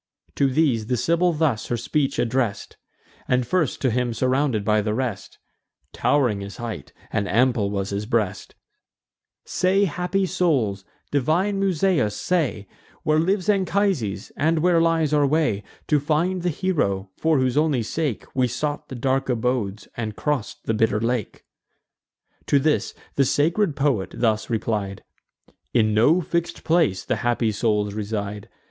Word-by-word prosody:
To 140 - +2
these 130 -6 +1
the 125 - 0
Sibyl 170 +6 +2
thus 150 -9 0
her 120 - -1
speech 135 +4 -1
address'd, 120 -3 -1 0.5
And 125 -1 +2
first 160 +1 0
to 130 - +3
him 120 0 -1
surrounded 130 -3 +1
by 105 0 +3
the 105 +1 -1
rest 125 -5 -4 0.6
Tow'ring 125 -9 +1
his 100 -1 -8
height, 115 -2 -6 0.2
and 100 0 0
ample 120 -3 +2
was 100 -1 -3
his 100 +1 -3
breast; 110 -5 -1 0.9
"Say, 190 +3 +2
happy 180 +3 -1
souls, 140 - 0 0.3
divine 170 +9 +1
Musaeus, 180 - +1
say, 140 - -1 0.4
Where 155 0 +3
lives 185 +3 0
Anchises, 190 - 0
and 160 +1 +1
where 175 -2 +4
lies 165 -2 +2
our 145 -1 +4
way 150 -9 +1 0.3
To 150 - +4
find 165 +5 0
the 175 - 0
hero, 105 - -1
for 160 -1 +2
whose 130 -1 +1
only 150 -5 +2
sake 140 +1 -2
We 130 -1 +3
sought 145 +6 -3
the 130 - -6
dark 130 +2 0
abodes, 115 -4 -1
and 110 -3 -4
cross'd 145 -5 -2
the 110 - 0
bitter 110 -1 +2
lake?" 115 -2 -2 1.0
To 145 - +4
this 150 +2 +1 0.2
the 140 - +5
sacred 160 +6 +1
poet 135 -11 0
thus 110 -2 +1
replied: 105 -4 -2 0.7
"In 110 -1 +3
no 145 +12 +4
fix'd 170 +1 -2
place 160 - +2
the - - 0
happy 120 -2 0
souls 105 -1 0
reside. 105 -1 -4
130 Hz, 150 wpm, -23 LUFS, 110-160 Hz, 1.0 s, the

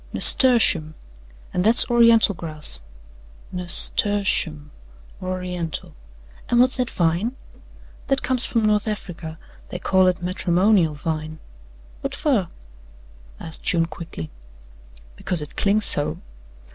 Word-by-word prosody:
"Nasturtium, 205 - +4 0.6
and 180 - -1
that's 225 +4 +5
Oriental 230 -3 +4
grass." 155 - 0 0.7
"Nas 180 -1 +3
tur 205 0 0
tium, 155 -6 -2 0.5
Oriental. 180 -3 -6 0.6
An' 240 - +1
what's 255 +2 +2
that 250 -2 -2
vine?" 175 +9 -2 0.7
"That 270 -1 -1
comes 255 -1 -1
from 230 -2 -1
North 210 0 0
Africa 175 -6 -7 0.3
they - - -6
call 185 +1 +1
it 180 -1 0
'matrimonial 180 -1 0
vine.'" 155 +1 -6 0.6
"Whut - - -5
fer?" 245 - -1 0.9
asked 160 - -6
June 165 -2 0
quickly. 160 - -10 0.8
"Because 175 - -3
it 150 - -9
clings 205 +1 +1
so." 145 - +6
180 Hz, 115 wpm, -21 LUFS, 160-215 Hz, 0.9 s, so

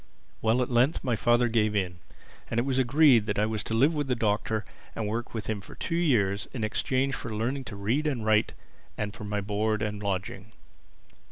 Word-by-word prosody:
Well, 115 +3 +3
at 125 - -5
length 125 +6 +2
my 125 -3 +1
father 120 +2 +3
gave 110 -2 +1
in; 90 -3 -1 0.5
and 115 - 0
it 120 - 0
was 135 -1 +1
agreed 130 -3 +5
that 105 - -1
I 105 - +3
was 110 -1 -2
to 115 - -2
live 140 +8 +4
with 145 -2 -2
the 125 - +1
Doctor 110 0 0 0.3
and 110 - -2
work 115 +3 -3
for 115 - -4
him 105 0 -4
for - - -12
two 165 - -4
years 110 - +1
in 115 - -3
exchange 130 +5 0
for 125 - -4
learning 125 +5 -2
to 105 - -7
read 115 +10 0
and 125 -7 -2
write 110 0 +3 0.4
and 105 -1 -3
for 105 - -8
my 105 0 -2
board 105 +2 -1
and 105 -1 -3
lodging. 100 +1 -4
110 Hz, 210 wpm, -28 LUFS, 105-125 Hz, 0.5 s, agreed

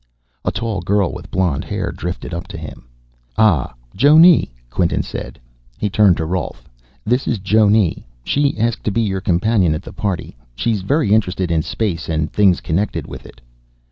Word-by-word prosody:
A - - 0
tall 110 -5 -3
girl 100 +1 +1
with - - -9
blonde 90 -7 0
hair - - -3
drifted 90 0 -6
up 85 - -5
to - - -8
him. - - -10 0.5
"Ah. 105 - +3 0.2
Jonne," 155 - +6 0.2
Quinton 85 +5 0
said. - - -7 0.4
He 105 - -2
turned 100 -4 +4
to 80 - -2
Rolf. 90 +3 -4 0.4
"This 125 +4 0
is 120 - 0
Jonne. 105 -1 +2 0.2
She 140 - 0
asked 115 +1 -1
to 105 - +1
be 115 - 0
your 95 -4 -1
companion 90 -2 +2
at - - -6
the - - -10
party. 95 -10 -3 0.2
She's 100 - -1
very 135 - +1
interested 95 -4 0
in 80 -1 +2
space 85 -2 -3
and 80 -1 -1
things 100 -4 +3
connected 95 +6 -2
with - - -10
it." - - -17
100 Hz, 170 wpm, -18 LUFS, 85-110 Hz, 0.5 s, Jonne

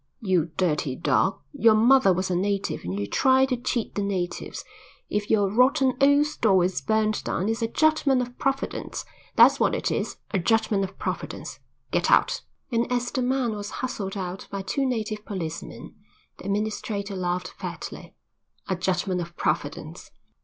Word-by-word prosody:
"You 185 - +1
dirty 150 -7 0
dog. 140 0 +1 0.2
Your 225 -1 +5
mother 235 -1 +5
was 185 +1 0
a - - +1
native 200 +2 -1
and 90 +3 -3
you 100 - -1
try 265 - +4
to 260 -1 0
cheat 240 -1 -2
the 205 - -2
natives. 190 -3 -3 0.5
If 205 0 -1
your 205 -2 +3
rotten 260 +5 +3
old 285 +1 +5
store 215 -11 +2
is 180 0 -1
burned 215 -1 +1
down 185 - -1
it's 225 +1 -1
a 230 - +1
judgment 310 0 +3
of 245 0 -4
Providence; 275 0 -2 0.3
that's - - +7
what - - +2
it - - -1
is, - - -2
a 195 - +1
judgment 220 0 +2
of 190 0 -6
Providence. - - -5 0.3
Get - - +1
out." - - +4 0.3
And 235 +1 0
as 245 0 0
the 260 - -1
man 250 -2 0
was 205 0 -5 0.2
hustled 200 -6 -4
out 185 0 -5
by 200 -1 -4
two 270 +8 0
native 215 -4 -2
policemen 170 -7 -6 0.5
the - - -11
administrator 205 0 -2
laughed 180 0 -2
fatly. - - -7 0.5
"A 190 - 0
judgment 180 0 -1
of 170 0 -8
Providence." - - -3
210 Hz, 165 wpm, -25 LUFS, 185-245 Hz, 0.5 s, that's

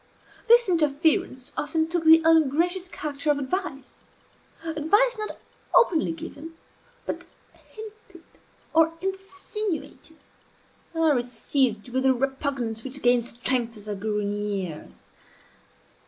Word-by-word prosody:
This 475 0 +6
interference 300 -5 +1
often 315 +2 0
took 330 0 -2
the 320 0 +8
ungracious 325 +4 +3
character 300 -3 -4
of 295 - +3
advice; 280 -1 -4 0.6
advice 330 +10 +2
not 425 - -4 0.4
openly 340 -10 +4
given, 325 0 -8 0.5
but - - -4 0.4
hinted 430 -5 -12 0.5
or 325 0 +4
insinuated. 385 -3 -5 0.8
I 325 -1 +3
received 245 -2 0
it - - -13
with 260 +1 +2
a 260 - +4
repugnance 265 -4 -2
which 270 +1 -5
gained 245 -1 +4
strength 240 -1 -1
as 210 0 -11
I 210 - -2
grew 210 +1 -2
in 205 0 -2
years. 195 - -4
300 Hz, 115 wpm, -25 LUFS, 245-340 Hz, 0.8 s, the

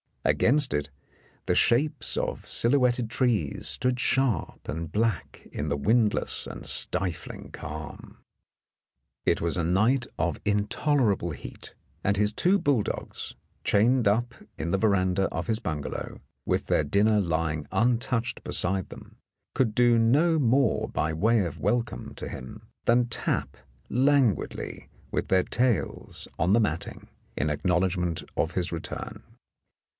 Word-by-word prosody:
Against 140 +1 +3
it 75 0 -1 0.6
the - - +2
shapes 145 +6 +2
of - - -3
silhouetted 125 -2 +2
trees 115 - 0
stood 125 -1 0
sharp 135 -3 0
and 80 0 -4
black 110 -3 -2
in 75 - -3
the 70 0 0
windless 110 - +1
and - - -8
stifling 90 -4 -2
calm. 75 0 -8 1.1
It - - +2
was 85 +1 0
a 85 - +1
night 110 +10 +2
of 85 +2 0
intolerable 105 - +1
heat, 75 - -10 0.3
and 100 +1 +1
his 105 +1 +2
two 185 - +3
bulldogs, 135 - -1 0.3
chained 115 +3 +3
up 120 +4 +1 0.2
in 80 +4 -3
the 95 - +2
veranda 95 -2 +2
of 80 +1 -3
his 110 -1 0
bunga 80 -10 -3
low, - - -6 0.3
with - - 0
their - - +2
dinner 105 +8 +3
lying 80 -4 -1
untouched 120 +2 0
beside 95 +1 -1
them, - - -12 0.4
could 120 -5 +1
do 120 -1 +5
no 150 +9 +4
more 130 -2 +2
by 80 +1 -1
way 110 +7 +3
of 85 - -6
welcome 120 +4 -1
to - - -6
him 65 - -9 0.2
than 120 +1 +4
tap 115 - -2 0.3
languidly 130 - +1 0.2
with - - -1
their 95 -1 +3
tails 120 -4 -1
on 90 +4 +3
the 115 - +5
matting 85 -8 -2 0.3
in 70 - 0
acknow 90 +4 +1
ledgment 90 -3 -1
of 80 - +1
his 90 -1 -1
return. 85 -1 -6
105 Hz, 140 wpm, -27 LUFS, 85-120 Hz, 1.1 s, do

